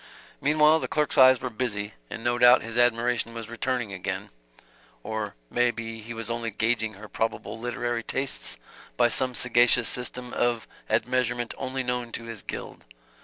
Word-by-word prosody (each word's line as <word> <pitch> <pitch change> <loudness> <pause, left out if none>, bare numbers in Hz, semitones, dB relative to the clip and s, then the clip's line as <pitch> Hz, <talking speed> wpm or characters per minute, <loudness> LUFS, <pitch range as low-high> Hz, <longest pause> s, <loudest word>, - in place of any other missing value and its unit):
Meantime 155 +2 +4
the - - -2
clerk's 150 -2 0
eyes 130 -1 +7
were 125 - -2
busy, 105 -3 -3 0.2
and 115 - -7
no 120 0 +1
doubt 125 +1 +7
his 115 0 -6
admiration 120 -1 +2
was 115 0 -7
returning 120 -3 -2
again 95 - -4 0.7
or 110 -1 -4 0.2
may 120 0 +3
be 115 -1 -5
he 115 +2 -9
was 115 -2 -5
only 115 0 -2
gauging 110 0 0
her 105 +2 -10
probable 110 0 -3
literary 120 0 -2
tastes 135 +3 -1 0.4
by 120 0 +5
some 125 +1 +1
sagacious 120 -1 +4
system 125 0 -2
of 120 -2 0 0.2
admeasurement 120 -1 0
only 130 0 -3
known 125 -1 -2
to 115 - -5
his 115 -2 -6
guild. - - -7
120 Hz, 165 wpm, -26 LUFS, 115-125 Hz, 0.7 s, eyes